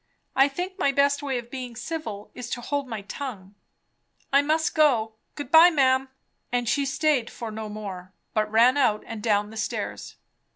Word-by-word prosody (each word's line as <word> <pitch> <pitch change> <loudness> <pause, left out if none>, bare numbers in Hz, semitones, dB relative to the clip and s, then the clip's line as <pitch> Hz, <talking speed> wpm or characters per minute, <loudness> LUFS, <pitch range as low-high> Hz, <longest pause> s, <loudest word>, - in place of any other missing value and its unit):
I 270 +1 +6
think 360 +7 -5
my 280 - +3
best 280 +1 +2
way 275 -3 -2
of 240 0 -7
being 250 -3 -6
civil 240 -6 -6
is 245 -1 -7
to 245 - -4
hold 285 +2 -2
my 225 -4 -5
tongue. 205 -4 -7 0.8
I 280 - +6
must 315 +3 +1
go 245 -8 +3 0.2
Good 290 -2 -7
bye, 330 +2 +9
ma'am! 265 -4 +2 0.2
" - - -48
and 245 -1 0
she 280 +4 +1
staid 275 -4 +1
for 230 -2 -7
no 215 0 -6
more, 195 -4 -7 0.2
but 215 -1 0
ran 235 +5 +5
out 220 -7 +2
and 225 -2 -7
down 210 -1 +1
the 220 - -10
stairs. 215 - -4
250 Hz, 190 wpm, -25 LUFS, 220-285 Hz, 0.8 s, bye